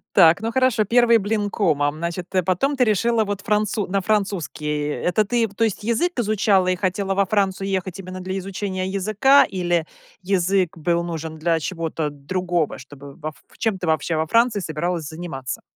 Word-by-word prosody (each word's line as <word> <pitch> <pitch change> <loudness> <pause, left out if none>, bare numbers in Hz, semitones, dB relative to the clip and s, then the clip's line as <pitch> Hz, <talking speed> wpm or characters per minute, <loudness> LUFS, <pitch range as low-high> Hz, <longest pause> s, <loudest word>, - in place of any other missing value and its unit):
Так, 165 +4 +6
ну, 225 - -2
хорошо, 255 -3 +2
1 235 +2 +4
блин 205 0 -1
комом, 150 -8 +1
значит, 170 +2 -4
э, 185 - +3
потом 190 - +1
ты 260 - +3
решила 225 +1 +2
вот 205 -1 -3
францу 210 -1 0
на 195 +1 0
французский. 170 -8 -1
Это 180 +7 +1
ты 230 +2 +1
в 200 - -18
то 230 - +1
есть, 220 -2 -1
язык 250 +7 0
изучала 205 -4 +2
и 185 - +2
хотела 195 +1 -1
во 200 0 +3
Францию 195 -1 0
ехать 185 -1 -2
именно 185 0 -7
для 185 +1 -4
изучения 190 0 -3
языка 215 +8 +4
или 175 -3 -1 0.4
язык 185 -1 +1
был 170 +1 0
нужен 160 -2 -5
для 165 +1 +1
чего-то 165 -3 -3
другого, 170 +3 -2
чтобы 140 +1 -12
во 155 -2 -5
Ф 150 - -14 0.2
чем 225 -4 0
ты, 175 - -4
вообще, 160 +1 0
во 160 - 0
Франции 230 +2 +3
собиралась 165 -1 -3
заниматься? 160 -5 -6
185 Hz, 185 wpm, -22 LUFS, 165-210 Hz, 0.4 s, Так